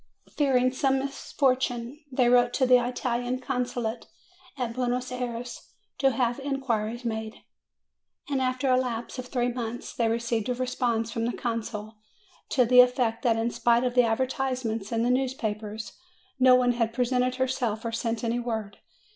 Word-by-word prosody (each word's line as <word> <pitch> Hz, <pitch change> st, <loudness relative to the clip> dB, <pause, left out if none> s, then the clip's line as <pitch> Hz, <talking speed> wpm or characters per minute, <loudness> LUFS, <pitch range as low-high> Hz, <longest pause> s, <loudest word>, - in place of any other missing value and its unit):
Fearing 255 Hz, -3 st, +3 dB
some 270 Hz, +1 st, +1 dB
misfortune, 265 Hz, -1 st, -1 dB
they 255 Hz, -1 st, +3 dB
wrote 245 Hz, 0 st, +4 dB
to 260 Hz, -, +2 dB
the 250 Hz, -1 st, +5 dB
Italian 245 Hz, 0 st, -1 dB
Consulate 245 Hz, -3 st, -3 dB, 0.5 s
at 245 Hz, -3 st, -2 dB
Buenos 250 Hz, 0 st, -1 dB
Ayres 245 Hz, -1 st, -5 dB, 0.3 s
to 270 Hz, -, +4 dB
have 240 Hz, 0 st, 0 dB
inquiries 245 Hz, -4 st, -2 dB
made, 220 Hz, -1 st, -4 dB, 0.8 s
and 275 Hz, -2 st, 0 dB
after 255 Hz, +1 st, 0 dB
a 255 Hz, -, +5 dB
lapse 245 Hz, -1 st, -3 dB
of 255 Hz, -, -6 dB
three 245 Hz, -1 st, 0 dB
months 240 Hz, -1 st, -5 dB
they 230 Hz, -2 st, +1 dB
received 230 Hz, -1 st, -1 dB
a 250 Hz, -, 0 dB
response 240 Hz, -3 st, -1 dB
from 230 Hz, -1 st, -2 dB
the 240 Hz, -, -3 dB
consul, 220 Hz, -2 st, -4 dB, 0.5 s
to 255 Hz, -3 st, +3 dB
the 250 Hz, +1 st, +8 dB
effect 245 Hz, -2 st, +1 dB
that 235 Hz, -3 st, +2 dB
in 230 Hz, +1 st, 0 dB
spite 235 Hz, +1 st, +2 dB
of 250 Hz, -1 st, -1 dB
advertisements 250 Hz, -2 st, 0 dB
in 230 Hz, 0 st, +1 dB
the 245 Hz, -, +2 dB
news 260 Hz, 0 st, +1 dB
256 -, -, -17 dB
MAY 215 Hz, -1 st, +2 dB
papers 215 Hz, +1 st, -8 dB, 0.4 s
no 255 Hz, 0 st, +7 dB
one 250 Hz, -1 st, +3 dB
had 230 Hz, -2 st, -1 dB
presented 250 Hz, +1 st, +1 dB
herself 255 Hz, -4 st, -1 dB
or 230 Hz, -, -1 dB
sent 230 Hz, 0 st, -2 dB
any 235 Hz, +1 st, 0 dB
word. 220 Hz, -4 st, -4 dB
245 Hz, 165 wpm, -27 LUFS, 230-255 Hz, 0.8 s, the